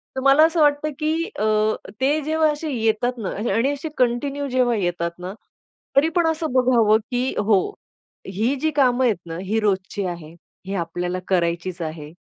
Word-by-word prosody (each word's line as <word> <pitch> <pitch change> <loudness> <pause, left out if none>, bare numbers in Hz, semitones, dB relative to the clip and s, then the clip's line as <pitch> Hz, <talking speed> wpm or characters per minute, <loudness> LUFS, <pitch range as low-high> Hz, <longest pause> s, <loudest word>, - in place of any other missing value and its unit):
तर 265 - -2
मला 275 +3 +7
असं 325 0 +1
वाटतं 295 +1 +2
की 310 0 0 0.3
अ, 215 0 +2 0.4
ते 290 +3 +2
जेव्हा 315 +1 +2
असे 300 +1 -5
येतात 230 +1 0
ना 210 -5 -3 0.2
आणि 260 +5 +2
असे 285 +3 -5
कंटिन्यू 275 +3 0
जेव्हा 250 -2 +2
येतात 175 -3 -2
ना, 185 +2 -6 0.6
तरी 285 +4 +5
पण 345 -2 +3
असं 320 -2 -1
बघावं 240 -4 +4
की 245 0 +1
हो, 205 -2 +3 0.7
ही 215 +8 0
जी 315 - +1
कामं 260 -2 +3
आहेत 225 -4 +2
ना 165 0 -6
ही 215 +4 0
रोजची 195 -1 -1
आहे. 170 -3 -7 0.3
ही 195 - -4
आपल्याला 175 0 -3
करायचीच 175 0 -1
आहे. 155 -1 -6
230 Hz, 170 wpm, -22 LUFS, 185-280 Hz, 0.7 s, मला